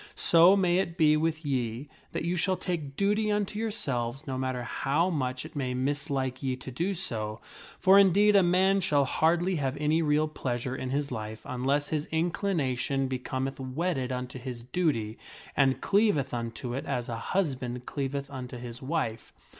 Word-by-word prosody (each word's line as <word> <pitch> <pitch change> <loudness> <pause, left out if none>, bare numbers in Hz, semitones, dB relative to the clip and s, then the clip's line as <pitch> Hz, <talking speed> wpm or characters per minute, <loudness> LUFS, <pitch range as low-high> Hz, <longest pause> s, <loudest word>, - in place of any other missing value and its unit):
/ - - -19
So 175 +4 +6
may 180 -2 +3
it 170 -2 -2
be 155 -2 +5
with 160 0 -1
ye 125 -1 -2 0.2
that - - -3
you 175 +1 0
shall 185 +2 +1
take 155 -7 -4
duty 210 +3 +1
unto 210 0 -1
yourselves 135 - -2
no 135 -3 -3
mat 130 0 -1
ter 125 - -4
how 150 +9 0
much 130 -3 -2
it 155 - -11
may 130 -3 -2
mislike 135 -1 -1
ye 130 -2 -1
to 130 +1 -9
do 175 +10 -1
so. 110 - -3 0.4
For 190 +1 +6
indeed 200 +2 +5
a 200 - +7
man 190 +2 +3
shall 145 -6 +3
hardly 170 +6 +2
have 135 -1 -1
any 150 +2 +2
real 150 0 +2
pleasure 125 -4 -3
in 130 - -4
his 140 +1 -1
life 110 -2 -5
unless 135 +3 0
his 155 -1 -1
inclination 155 -6 0
becometh 130 +1 -3
wedded 130 0 -2
unto 125 0 -4
his 125 -2 -6
duty 125 -6 -1 0.4
and 135 -2 +3
cleaveth 200 - +2
unto 120 +1 -4
it 135 - -4
as 120 -1 -2
a 115 - -3 0.2
husband 125 -8 -1
cleaveth 140 0 -3
unto 125 -2 -6
his 120 0 -8
wife. 130 -6 -2
140 Hz, 180 wpm, -28 LUFS, 125-170 Hz, 0.4 s, a